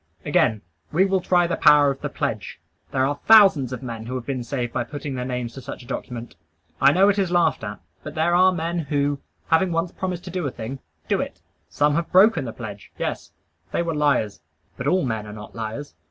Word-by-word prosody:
Again: 110 -1 +2 0.3
we 185 +5 +4
will 190 -1 +1
try 175 -1 +3
the 170 - -1
power 150 -2 +6
of 135 - -7
the - - -3
pledge. - - -4 0.3
There 130 0 +2
are 145 +1 -2
thousands 195 - +7
of 125 +1 -6
men 115 -2 -6
who 130 - -4
have 125 -2 -4
been 130 -3 -3
saved 120 -2 -3
by 120 - 0
putting 145 +3 -6
their 125 -1 -3
names 125 -2 -3
to 135 - -9
such 125 - -8
a - - -15
document. 120 -2 -6 0.5
I 140 - +7
know 190 +5 +5
it 205 0 +3
is 190 -3 +1
laughed 175 -7 +2
at; 105 -1 -5 0.2
but - - -8
there 160 +2 +2
are 185 +1 +6
men 170 0 -2
who, 145 -2 0 0.3
having 175 +2 +3
once 165 +1 -1
promised 185 0 -4
a 180 -5 -2
thing, 125 +2 -7 0.3
do - - +1
it. - - -6 0.3
"Some 145 0 +2
have 170 +2 -1
broken 185 -5 +5
the 115 - -4
pledge." 105 -4 -9
Yes; - - -3 0.4
they - - 0
were 165 -1 -2
liars. 145 -9 +1 0.3
But 125 - -4
all 185 +2 +2
men 110 -3 -3
are 105 - -8
not 105 0 -10
liars. 115 +6 -6
145 Hz, 220 wpm, -23 LUFS, 120-175 Hz, 0.5 s, thousands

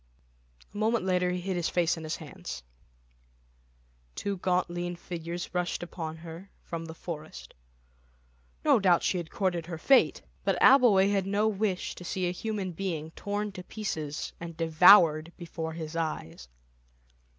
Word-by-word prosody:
A - - -8
moment 220 -1 +1
later 180 -1 +2
he 180 0 -2
hid 190 +1 -2
his 175 -1 0
face 175 -1 +2
in 165 - -8
his 155 - -3
hands; 60 - -8 1.5
two 200 -1 -2
gaunt 180 0 +1
lean 175 0 -4
figures 175 0 -6
rushed 180 -1 -1
upon 160 -2 -6
her 165 +4 -10
from 165 -1 -5
the 160 0 -8
forest. 155 -2 -8 1.1
No - - +5
doubt 180 -4 +4
she 185 - +1
had 165 -2 -6
courted 180 -6 -1
her 170 -2 -5
fate, 270 +11 +4 0.2
but - - +1
Abbleway 225 -7 +6
had 195 -2 0
no 205 +2 +2
wish 205 -3 -1
to - - -10
see 180 +1 -2
a - - 0
human 200 0 -3
being 160 -3 -4
torn 205 +3 -3
to 185 - -8
pieces 160 -9 -4
and 170 -1 -8
devoured 165 -1 +6
before 165 -2 -5
his 160 -1 -6
eyes. 150 - -4
175 Hz, 155 wpm, -29 LUFS, 165-195 Hz, 1.5 s, Abbleway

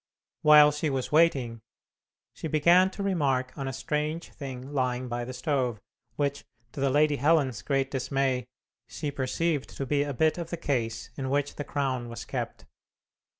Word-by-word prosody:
While 150 -1 +8
she 150 +1 -1
was 135 -2 -2
waiting, 135 -8 +3 0.7
she - - -5
began 170 +5 +5
to 200 +1 -6
remark 140 -9 0
on 135 -1 -4
a - - -2
strange 150 +5 -2
thing 135 -1 -7
lying 130 -2 0
by 120 0 -3
the 130 - -6
stove, 125 -3 -1 0.4
which, 140 +1 -1 0.3
to - - -8
the 140 - +3
Lady 150 +1 +3
Helen's 140 -5 +2
great 135 -1 0
dismay, 130 -2 0 0.4
she 145 +4 -4
perceived 140 +2 -1
to 135 - -2
be 145 +1 +1
a 145 0 -1
bit 155 +6 +1
of 170 -1 -5
the 170 - -3
case 120 -7 -2
in 130 -1 -3
which 145 +1 0
the 145 - -4
crown 130 -5 -2
was 115 - -7
kept. - - -5
140 Hz, 170 wpm, -28 LUFS, 130-150 Hz, 0.7 s, While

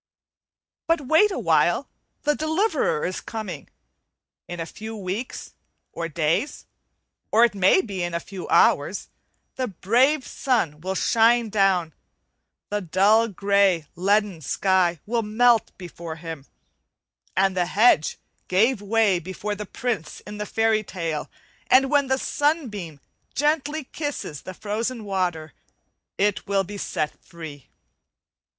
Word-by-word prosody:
But 330 -2 +2
wait 320 +10 +4
awhile, 380 - +2 0.4
the 295 - +3
deliverer 315 - 0
is 185 - -3
coming. 220 -2 -6 0.8
In 175 - -6
a 165 - -2
few 220 +5 -8
weeks 205 +4 -5 0.4
or 165 0 -4
days, 165 - -1 0.7
or 230 +2 +6
it 235 - -1
may 190 -1 +4
be 195 -4 -5
in 175 -1 -2
a - - 0
few 190 +1 -8
hours, - - +3 0.5
the 255 -1 -1
brave 250 - +2
sun 195 - -1
will 190 +2 -3
shine 230 +2 +3
down; 195 -5 +2 0.8
the 210 0 -1
dull 200 +6 +3
grey, 200 -4 +2
leaden 200 -1 +1
sky 180 +2 +1
will 235 +2 0
melt 225 +2 +3
before 170 -3 -8
his, 160 -4 -8 0.9
as 195 0 +3
the 180 -1 0
hedge 205 -7 +3 0.3
gave 215 +5 +2
way 205 -3 +2
before 190 +4 -5
the 205 0 -6
prince 240 -8 -3
in 210 0 -9
the 210 - -3
fairy 225 0 +2
tale, 165 -7 -4 0.4
and 265 +1 +5
when 285 -2 +3
the 265 0 +2
sunbeam 245 - -1 0.4
gently 300 +1 0
kisses 275 - -5
the 185 - -9
frozen 220 +3 -3
water 175 -5 -2 0.6
it 205 0 0
will 195 -1 +2
be 200 +2 -8
set 150 -4 -3
free. 160 -6 -10
205 Hz, 130 wpm, -24 LUFS, 180-240 Hz, 0.9 s, or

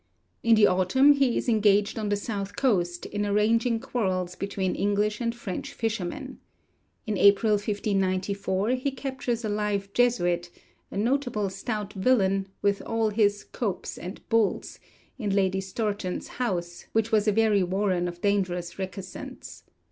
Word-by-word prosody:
In 230 -1 +5
the 215 -1 +6
autumn 190 +11 +4
he 275 -4 +2
is - - -2
engaged 210 -2 +3
on 210 -1 -2
the 205 - +2
south 200 -1 -4
coast 175 -9 0
in 205 0 -3
arranging 225 +3 +2
quarrels 185 -7 -2
between 195 -1 -2
English 205 +2 0
and 230 0 -1
French 200 -6 -5
fishermen. 225 +5 -4 0.7
In 210 -4 -2
April 200 +2 +5
1594 200 -1 0
he 255 +2 0
captures 260 -3 -3
a - - -1
live 205 -1 -1
Jesuit, 175 -8 +2 0.4
'a - - -6
notable 230 -3 0
stout 210 0 -4
villain,' 195 -3 +2 0.2
with 200 0 +2
all 225 -1 0
'his 205 -1 +2
copes 210 -7 -4
and 185 +4 -8
bulls,' 225 -3 0 0.4
in 205 -4 -1
Lady 190 -1 +2
Stourton's 200 -1 -3
house, 175 -8 -3
which 225 0 +1
was 215 -1 +3
a - - +5
very 215 -1 +3
warren 185 -1 0
of 175 0 -7
dangerous 185 -3 -1
recusants. 190 0 -7
205 Hz, 145 wpm, -26 LUFS, 190-225 Hz, 0.7 s, the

